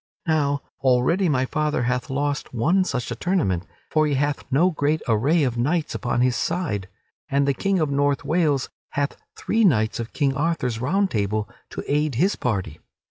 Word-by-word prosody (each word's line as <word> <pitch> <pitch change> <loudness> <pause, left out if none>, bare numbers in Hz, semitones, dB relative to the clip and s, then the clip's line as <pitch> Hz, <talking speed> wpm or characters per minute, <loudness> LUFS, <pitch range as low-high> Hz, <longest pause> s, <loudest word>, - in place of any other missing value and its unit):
Now, 145 -3 +1 0.2
already 135 +9 +3
my 130 -3 +2
father 150 -2 0
hath 125 +3 -1
lost 140 -1 -2
one 170 +11 +3
such 125 -7 -3
a - - -2
tournament, 115 - 0 0.2
for 155 -1 +3
he 145 - +1
hath 145 +1 0
no 140 +6 +4
very 185 -1 +3
great 150 +2 0
array 135 +9 +3
of 120 -3 -1
knights 155 +5 0
upon 120 -1 -1
his 125 -1 +2
side, 155 - -2 0.4
and 140 0 +2
the 140 - +3
King 195 +7 0
of 155 -4 0
North 140 0 +1
Wales 155 -5 +1 0.2
hath 140 0 -1 0.2
three 225 +1 0
knights 115 - +3
of 115 0 -5
King 140 -3 +1
Arthur's 135 -6 -1
Round 190 +9 +1
Table 105 0 -1 0.2
to - - -6
aid 150 -1 +1
his 185 - +2
party. 95 - -2
140 Hz, 185 wpm, -23 LUFS, 125-155 Hz, 0.4 s, no